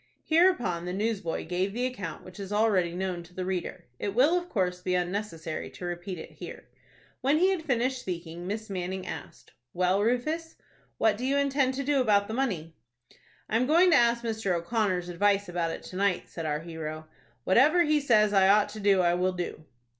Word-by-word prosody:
Hereupon 315 - +3
the 180 - -3
newsboy 205 -4 -2
gave 180 +4 -1
the 245 +2 -1
account 200 -10 -5
which 185 +1 -12
is 195 0 -6
already 200 -5 +2
known 185 -1 -2
to 175 +1 -17
the 185 0 -3
reader. 185 -2 -4
It 200 0 -3
will, 285 +8 +5
of 355 0 -2
course, 180 -3 -1
be 180 0 0
unnecessary 175 -3 -3
to 180 - -9
repeat 175 +1 -5
it 160 - -9
here. - - -10 0.5
When 280 +3 +3
he 370 +4 +4
had 375 -4 -1
finished 260 -3 0
speaking, 175 -2 -6
Miss 215 +2 -4
Manning 185 -1 -4
asked, - - -9 0.2
"Well, 185 +2 +2
Rufus, 305 +9 -1 0.4
what 220 -2 +2
do - - -4
you 280 +1 +2
intend 275 -2 +1
to 275 - -2
do 280 -1 +2
about 205 -4 +3
the 220 - -5
money?" 190 -11 -2 0.7
"I 220 - +1
am 250 +2 +1
going 345 +4 +5
to - - +6
ask 235 -2 +3
Mr. 220 -5 -1
O'Connor's 180 0 -1
advice 200 +3 +1
about 175 -1 -1
it - - -6
to - - -10
night," 200 -2 +1
said 165 -2 -5
our 150 0 -1
hero. 160 -1 -6 0.4
"Whatever 295 - +5
he 305 -1 +3
says 215 -7 +3
I 190 -1 +5
ought 205 +1 +4
to 215 +1 -8
do, 200 -2 +4
I 175 -1 +3
will 180 +1 +1
do." 175 -3 -5
200 Hz, 200 wpm, -28 LUFS, 180-245 Hz, 0.7 s, to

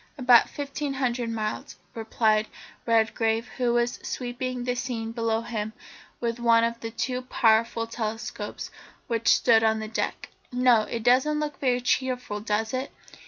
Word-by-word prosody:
"About 250 -3 +6
fifteen 285 0 -4
hundred 245 -3 -1
miles," 215 -2 -4 0.2
replied 220 -1 +1 0.4
Redgrave, 225 0 +1
who 245 -2 +1
was 240 0 0
sweeping 250 0 -4
the 245 0 0
scene 240 -3 -4
below 230 -1 0
him 220 -2 -4 0.5
with 235 0 -2
one 230 -1 +4
of 230 0 -1
the 225 - -5
two 250 +2 -2
powerful 230 -2 +2
telescopes 225 -1 -5 0.3
which 230 -2 -2
stood 225 -2 +5
on 220 0 +3
the 220 0 -4
deck. 220 - -3 0.2
"No, 245 -3 +3
it 230 -1 -4
doesn't 260 +5 +3
look 300 -1 -4
very 250 -3 +1
cheerful, 250 -4 -1
does 215 +2 -1
it? 260 +2 -3
235 Hz, 150 wpm, -26 LUFS, 225-250 Hz, 0.5 s, About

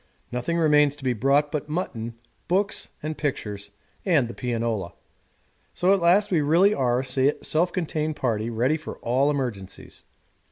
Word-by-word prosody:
Nothing 125 +8 -1
remains 150 -3 +4
to 145 - -15
be 130 -1 +1
brought 140 +5 +2
but 150 0 -3
mutton, 120 -9 -3 0.3
books 195 +4 0
and 155 +1 -3
pictures, 105 -10 -3 0.3
and 155 - +3
the 120 - -7
pianola. 115 -6 -2 0.8
So 185 +2 +3
at 195 - +1
last 185 +5 +4
we 165 -4 +3
really 170 +8 +4
are 125 -6 +1
a 135 +2 0
self 170 +3 +1
contained 155 -3 -2
party 115 -5 -1
ready 125 +7 +1
for 155 - -8
all 130 +4 +2
emergencies. 120 -10 -4
145 Hz, 155 wpm, -25 LUFS, 120-160 Hz, 0.8 s, remains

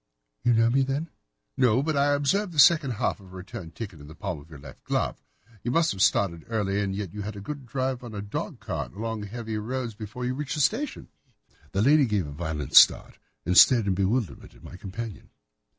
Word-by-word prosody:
"You 120 0 +4
know 115 +1 +3
me, 135 +2 +3
then?" 140 +5 -2 0.4
"No, 125 -1 +3
but 155 0 -1
I 145 +1 +3
observe 175 +7 0
the - - -9
second 150 -3 +6
half 115 0 -1
of 95 - -15
a - - -12
return 90 -2 -8
ticket 95 -2 -8
in 75 - -12
the 80 - -12
palm 90 -3 -4
of 75 +3 -16
your 80 - -11
left 70 -1 -13
glove. - - -2 0.4
You 120 - -3
must 165 +6 +2
have 95 - -4
started 95 -4 +2
early, 105 -3 -1
and 95 -1 -2
yet 100 -4 -5
you 105 - -5
had 105 +1 -5
a - - -7
good 135 +5 -7
drive 130 +1 -2
in 120 -3 -9
a 100 - -4
dog 100 - -5
cart, - - -5
along 110 +1 -4
heavy 110 0 -5
roads, 120 +1 -4
before 110 +3 -7
you 125 - -1
reached 145 +2 -4
the 150 - 0
station." 245 - -1 0.6
The 100 - +1
lady 145 +1 +5
gave 105 -5 0
a 75 - -7
violent 75 -2 -4
start - - +6 0.3
and 90 - 0
stared 120 +2 +7
in 100 - +1
bewilderment 100 +4 -2
at - - -19
my - - -10
companion. 100 +3 -7
110 Hz, 225 wpm, -26 LUFS, 95-130 Hz, 0.6 s, stared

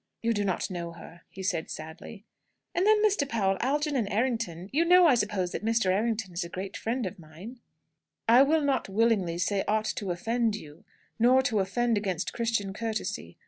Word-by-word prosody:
"You 230 0 +2
do 205 -1 -1
not 190 0 -1
know 170 -2 -5
her," 170 0 -13
he 190 - -9
said 165 -4 -1
sadly. 160 +7 -9 0.5
"And 365 +4 +1
then, 430 0 +5
Mr. 380 -10 +1
Powell, 195 -6 +1
Algernon 280 -3 0
Errington 210 -6 -1
you 315 +4 +3
know, 360 +1 +6
I 305 - +6
suppose, 210 -6 0
that - - -5
Mr. 225 -4 +2
Errington 215 -1 -1
is 170 - -2
a 170 - -7
great 190 +2 -6
friend 235 +1 -2
of 190 +1 -6
mine?" 175 +10 -11 0.7
"I 235 +3 +7
will 310 +3 +4
not 275 -7 0
willingly 195 -5 +1
say 195 +3 0
aught 215 0 +1
to 200 - -3
offend 225 +5 0
you, 155 -4 -11 0.3
nor 255 +3 +5
to 235 -6 +1
offend 225 +3 +1
against 190 -5 -3
Christian 230 -4 -1
courtesy. 220 +1 -4
215 Hz, 185 wpm, -28 LUFS, 190-240 Hz, 0.7 s, I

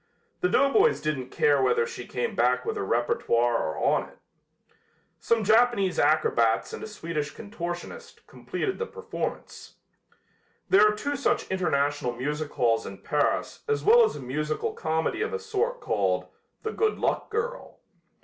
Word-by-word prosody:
The 360 - +1
doughboys 400 +12 +4
didn't 140 -5 -3
care 145 -2 +2
whether 125 -2 +2
she 120 - -8
came 125 - -2
back 125 +2 +1
with - - -2
her - - -2
repertoire 120 +2 +1
or 80 - -3
on - - +1
it. - - -21 1.0
Some 230 -1 +1
Japanese 220 -3 +3
acrobats 130 -7 +2
and - - -6
a - - -5
Swedish 165 -8 -4
contortionist 205 - -7
completed 385 0 -4
the 465 - -2
performance. 465 0 -6 1.0
There 205 +2 +7
are 210 - +1
two 285 +7 -3
such 280 - 0
international 145 -8 0
music 150 +5 -3
halls 115 -2 +1
in 100 - -10
Paris 150 -1 -1
as 440 0 0
well 470 +3 +7
as 440 - +1
a - - -6
musical 150 +4 -2
comedy 160 - -1
of 440 - -2
a 460 - -2
sort 455 +3 -2
called - - 0 0.3
"The 440 - -2
Good 440 -1 0
Luck - - -1
Girl." 465 +3 -4
170 Hz, 155 wpm, -26 LUFS, -, 1.0 s, There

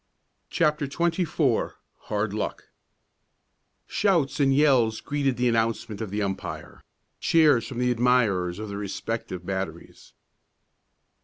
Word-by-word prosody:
CHAPTER 150 -4 +1
XXIV 165 -4 0 0.3
HARD 105 -1 -1
LUCK 105 - -3 1.2
Shouts 165 -9 +1
and 135 -1 +4
yells 130 -6 +3
greeted 140 -3 -1
the 125 0 +2
announcement 115 -2 0
of 110 - -4
the 105 +2 -2
umpire 95 -1 -5 0.4
cheers 150 -8 +4
from 130 - -7
the 125 0 +2
admirers 115 -8 +2
of 110 +1 -5
the 100 - -5
respective 100 -2 -4
batteries. 95 -3 -6
120 Hz, 110 wpm, -26 LUFS, 105-140 Hz, 1.2 s, and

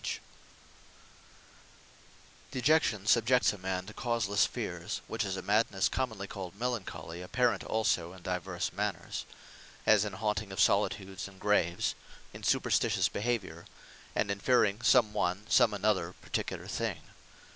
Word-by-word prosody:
Melancholy - - -3 2.3
Dejection, 130 -6 +2
subjects 115 +4 +4
a - - -8
man 95 0 -2
to 105 - -10
causelesse 115 -5 +1
fears; - - -4
which - - -2
is 95 -1 -3
a - - -5
Madnesse 105 -2 +2
commonly 110 -7 -2
called 95 -2 -7
MELANCHOLY, 95 -8 -4
apparent 115 +2 +1
also 90 -6 0
in 95 -1 -13
divers 90 0 -3
manners; 95 -3 -3 0.6
as 105 -2 +5
in 105 - -4
haunting 105 -1 -2
of 95 - -6
solitudes, 95 -1 +1
and 95 -1 -15
graves; 95 -4 +1 0.4
in - - -9
superstitious - - +2
behaviour; 100 -7 -3 0.5
and 100 - +1
in 100 - -3
fearing 110 -2 +3
some 120 -4 +4
one, 100 0 -1
some 115 - +5
another 100 -4 0
particular - - -4
thing. - - -3
100 Hz, 135 wpm, -31 LUFS, 95-110 Hz, 2.3 s, as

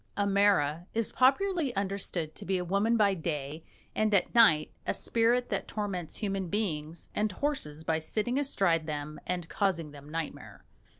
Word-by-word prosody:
A 205 - +2
mara 195 -5 +2
is 230 -1 0
popularly 285 - +2
understood 195 -5 -2
to - - -11
be 190 0 0
a 180 - -3
woman 200 +6 +2
by 205 -2 +4
day 155 -3 -4 0.3
and 215 0 +1
at 190 - +2
night 205 -11 +5 0.2
a - - +1
spirit 240 +2 +2
that - - -2
torments 195 -6 -4
human 195 -3 -2
beings 165 -5 -3
and 210 0 0
horses 185 - -3
by 160 0 0
sitting 220 - -1
astride 175 - +1
them 150 0 -5
and 175 -2 -2
causing 170 -7 -1
them 145 0 -12
nightmare. 160 0 -6
195 Hz, 165 wpm, -30 LUFS, 160-215 Hz, 0.3 s, night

